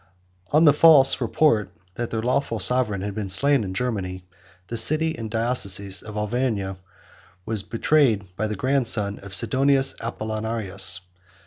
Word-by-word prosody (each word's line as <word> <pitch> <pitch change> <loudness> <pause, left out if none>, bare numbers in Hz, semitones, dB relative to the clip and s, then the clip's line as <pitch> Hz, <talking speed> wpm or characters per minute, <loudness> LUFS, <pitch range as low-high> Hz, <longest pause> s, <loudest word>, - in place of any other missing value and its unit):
103 150 - +1
On 160 - +4
the 145 - +6
false 145 -4 +5
report, 115 -2 +1 0.2
that 120 +3 -5
their 110 -1 -4
lawful 125 -1 -1
sovereign 110 -2 +1
had 100 +1 -5
been 105 -1 -5
slain 135 +6 +2
in 95 - -6
Germany, 95 -4 -4 0.4
the 115 - -7
city 155 +7 +3
and 115 -1 -7
diocese 100 -5 -1
of 105 -1 -9
Auvergne 105 -3 -3 0.7
were 110 - -3
betrayed 115 -4 +1
by 110 +3 -3
the 105 - -4
grandson 115 -4 +1
of 100 0 -3
Sidonius 135 +4 +3
Apollinaris. 110 -5 -1
110 Hz, 145 wpm, -22 LUFS, 100-130 Hz, 0.7 s, the